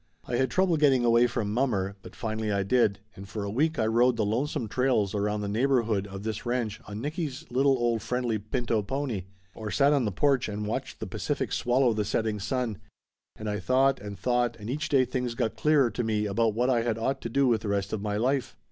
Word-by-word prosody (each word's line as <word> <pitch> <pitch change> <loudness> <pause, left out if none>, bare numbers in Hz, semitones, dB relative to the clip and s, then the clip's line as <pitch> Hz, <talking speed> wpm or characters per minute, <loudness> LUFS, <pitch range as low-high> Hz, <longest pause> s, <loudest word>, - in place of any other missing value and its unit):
I 120 - -1
had 130 0 +2
trouble 180 +4 +2
getting 135 -5 +4
away 120 +1 +5
from 115 -3 -2
mommer 105 -6 0
but - - -12
finally 110 -1 -2
I 100 -1 +1
did, 100 -1 +2
and 100 +1 -10
for 105 -1 -4
a 100 - -3
week 155 +8 +1
I 110 - +1
rode 120 +2 +3
the 110 - +1
lonesome 125 +4 -1
trails 110 -4 +1
around 105 0 -1
the 100 - -3
neighborhood 115 -3 +1
of 95 0 -8
this 110 -1 -3
ranch 120 -3 -2
on 105 +1 -6
Nicky's 150 0 -4
little 135 +2 +3
old 120 -2 0
friendly 120 -1 -1
pinto 110 +2 -1
pony, 120 -3 -3 0.3
or 110 -1 -6
sat 140 +5 +3
on 140 -4 +2
the 105 - 0
porch 135 +3 +2
and 105 0 -4
watched 105 - -4
the - - -2
Pacific - - -3
swallow 125 0 +2
the 105 -1 0
setting 110 +1 -1
sun, 115 0 -2 0.6
and 110 - -7
I 105 0 -1
thought 135 +6 +2
and 100 0 -7
thought 120 +3 +1
and 105 +3 -5
each 150 +3 -2
day 135 -3 +4
things 125 -2 -3
got 115 -3 -1
clearer 145 -6 +3
to 120 - -2
me 110 -1 0
about 110 +1 +1
what 125 +3 +2
I 120 -2 +3
had 115 -1 -1
ought 135 +4 -1
to 115 - -4
do 140 +4 +2
with 120 -3 +2
the - - -5
rest 100 -1 -1
of 110 - -2
my 105 0 -2
life. 130 +4 0
115 Hz, 230 wpm, -27 LUFS, 105-130 Hz, 0.6 s, away